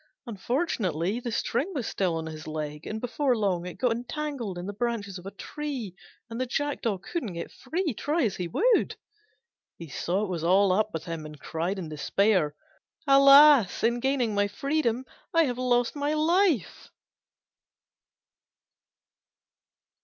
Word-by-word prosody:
Unfortunately, 210 Hz, -, -1 dB
the 240 Hz, -1 st, -5 dB
string 255 Hz, -, -1 dB
was 255 Hz, -5 st, -2 dB
still 185 Hz, -5 st, -1 dB
on 160 Hz, -, -4 dB
his 155 Hz, -1 st, -8 dB
leg, 150 Hz, -1 st, -5 dB
and 220 Hz, -, -4 dB
before 245 Hz, +2 st, 0 dB
long 185 Hz, -4 st, 0 dB
it 180 Hz, -, -7 dB
got 250 Hz, -2 st, +1 dB
entangled 245 Hz, -, -4 dB
in 175 Hz, -, -5 dB
the 205 Hz, -, -5 dB
branches 205 Hz, -4 st, -3 dB
of 180 Hz, -, -10 dB
a -, -, -6 dB
tree 270 Hz, -, -5 dB, 0.3 s
and 230 Hz, +2 st, -5 dB
the 255 Hz, -, -1 dB
Jackdaw 245 Hz, -6 st, -1 dB
couldn't 230 Hz, -, -5 dB
get 170 Hz, -, -6 dB
free, 335 Hz, -3 st, -3 dB
try 300 Hz, +8 st, 0 dB
as 205 Hz, -5 st, 0 dB
he 180 Hz, -, -3 dB
would. 455 Hz, -, +2 dB, 0.8 s
He 165 Hz, -2 st, -9 dB
saw 180 Hz, +8 st, -1 dB
it -, -, -2 dB
was 170 Hz, -3 st, -3 dB
all 190 Hz, +3 st, +4 dB
up 215 Hz, +3 st, +1 dB
with 160 Hz, 0 st, -5 dB
him, 165 Hz, -3 st, -5 dB
and 150 Hz, -1 st, -10 dB
cried 170 Hz, +5 st, -3 dB
in 180 Hz, -4 st, -5 dB
despair, 155 Hz, 0 st, +1 dB, 0.5 s
"Alas, 275 Hz, -4 st, +7 dB
in 235 Hz, +1 st, +2 dB
gaining 260 Hz, -3 st, 0 dB
my 205 Hz, 0 st, +2 dB
freedom 260 Hz, +1 st, -1 dB, 0.3 s
I 330 Hz, -, +6 dB
have 250 Hz, -4 st, -2 dB
lost 245 Hz, 0 st, +1 dB
my 290 Hz, +1 st, -1 dB
life." 325 Hz, -, +1 dB
225 Hz, 155 wpm, -27 LUFS, 180-275 Hz, 0.8 s, Alas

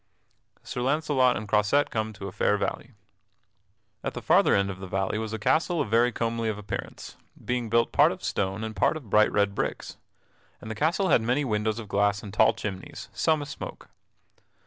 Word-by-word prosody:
[Sidenote: -, -, -21 dB
Sir 125 Hz, -, -4 dB
Launcelot 135 Hz, -2 st, +2 dB
and 105 Hz, +1 st, -6 dB
Croisette 105 Hz, +8 st, +2 dB
come 110 Hz, -1 st, -2 dB
to 100 Hz, 0 st, -7 dB
a -, -, -6 dB
fair 105 Hz, +2 st, +1 dB
valley] 120 Hz, +4 st, -4 dB, 1.1 s
At -, -, -4 dB
the -, -, -5 dB
farther -, -, +4 dB
end 100 Hz, 0 st, +1 dB
of 95 Hz, -, -9 dB
the 95 Hz, -, -7 dB
valley 95 Hz, +3 st, -1 dB
was 110 Hz, -1 st, -4 dB
a 110 Hz, -, -3 dB
castle 165 Hz, -, +1 dB
of 110 Hz, -, -2 dB
very 120 Hz, +2 st, +4 dB
comely 115 Hz, 0 st, -1 dB
of 105 Hz, -, -3 dB
appearance, 105 Hz, -2 st, -7 dB, 0.3 s
being 125 Hz, -2 st, -1 dB
built 115 Hz, 0 st, +2 dB
part -, -, +5 dB
of -, -, -8 dB
stone 95 Hz, +3 st, -2 dB
and 110 Hz, -1 st, -5 dB
part 155 Hz, -, +2 dB
of 125 Hz, -10 st, -12 dB
bright 105 Hz, 0 st, +5 dB
red 100 Hz, -1 st, +1 dB
bricks; -, -, -4 dB, 0.6 s
and 110 Hz, -, -8 dB
the -, -, -2 dB
castle 170 Hz, -, +1 dB
had -, -, +5 dB
many 125 Hz, +6 st, 0 dB
windows 110 Hz, -1 st, -1 dB
of 115 Hz, -3 st, -7 dB
glass 100 Hz, 0 st, +1 dB
and 100 Hz, -2 st, -8 dB
tall 110 Hz, +1 st, +4 dB
chimneys, 95 Hz, -3 st, -6 dB
some 155 Hz, -2 st, +1 dB
a -, -, -7 dB
smoke. 140 Hz, -, -8 dB
110 Hz, 205 wpm, -26 LUFS, 105-125 Hz, 1.1 s, part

